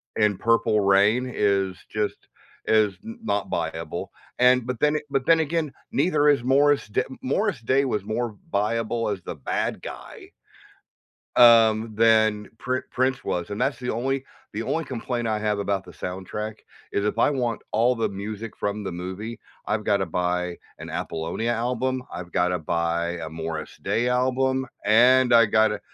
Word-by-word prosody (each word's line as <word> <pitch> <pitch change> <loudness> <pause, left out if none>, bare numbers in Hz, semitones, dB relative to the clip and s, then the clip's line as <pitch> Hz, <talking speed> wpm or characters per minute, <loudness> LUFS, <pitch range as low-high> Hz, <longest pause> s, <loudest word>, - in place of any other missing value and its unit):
in 105 -3 +2
Purple 115 -1 +2
Rain 100 +6 +3
is 95 -2 +1
just 105 -1 -1 0.5
is 105 -3 +3
n 230 +1 -8
not 100 - -1
viable, 80 0 -4 0.3
and 125 -1 +5
but 125 -2 -4
then 150 0 +3
but 135 -2 -1
then 165 -1 +5
again, 160 -1 -1 0.2
neither 150 0 +2
is 145 -4 +3
Morris 140 0 +3
D 105 - 0 0.2
Morris 185 - 0
Day 130 +4 +2
was 105 -6 -1
more 115 +2 -2
v 105 - -19
viable 115 +2 0
as 100 -3 -3
the 85 - -6
bad 70 - -2
guy - - -10 1.1
um, 115 -2 +6
than 110 -1 +3
Pr 130 0 -1
Prince 130 0 0
was, 90 +2 -3
and 100 - -4
that's - - 0
the 125 -1 -3
only 135 +3 -1 0.3
the 110 - -3
only 160 +7 -1
complaint 120 -2 -3
I 110 -1 0
have 105 -1 -1
about 100 -1 -1
the 90 - -12
soundtrack 95 +4 -5 0.4
is 100 - -1
if 105 - -1
I - - +4
want 120 -5 -1
all 120 +3 +3
the 115 -2 0
music 105 +3 -6
from 105 +1 -2
the 100 - -4
movie, 95 +6 -6 0.3
I've 105 0 -1
gotta 100 -3 +1
buy 90 +1 -1 0.2
an - - -8
Apollonia 85 +9 -2
album. 125 +2 -1
I've 90 0 -7
gotta 90 0 +1
buy 85 +1 -1
a 80 - -4
Morris 80 0 -6
Day 120 +2 0
album, 130 +1 +1 0.2
and 125 +4 +5
I 115 -1 +7
gotta 110 -1 +2
110 Hz, 165 wpm, -24 LUFS, 100-125 Hz, 1.1 s, I